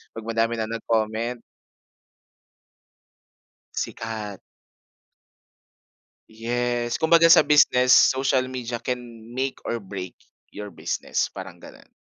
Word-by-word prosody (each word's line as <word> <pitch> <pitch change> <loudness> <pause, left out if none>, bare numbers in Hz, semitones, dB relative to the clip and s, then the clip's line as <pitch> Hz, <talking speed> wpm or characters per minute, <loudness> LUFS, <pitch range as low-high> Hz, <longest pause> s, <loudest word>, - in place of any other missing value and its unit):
pag 115 - -7
madami 115 0 0
ng 110 0 -3
nag-comment. 115 +2 -1 2.3
Sikat. 110 -3 -5 1.9
Yes, 120 +1 -2
kumbaga 165 +1 +6
sa 165 - +8
business 125 -4 +4 0.2
social 130 -1 +1
media 125 -2 -5
can 120 -2 -6
make 130 +1 -2
or 115 -2 -3
break 95 -2 -7 0.4
your 105 0 -7
business 85 - -2
parang - - -9
ganun. - - -15
115 Hz, 95 wpm, -24 LUFS, 110-125 Hz, 2.3 s, sa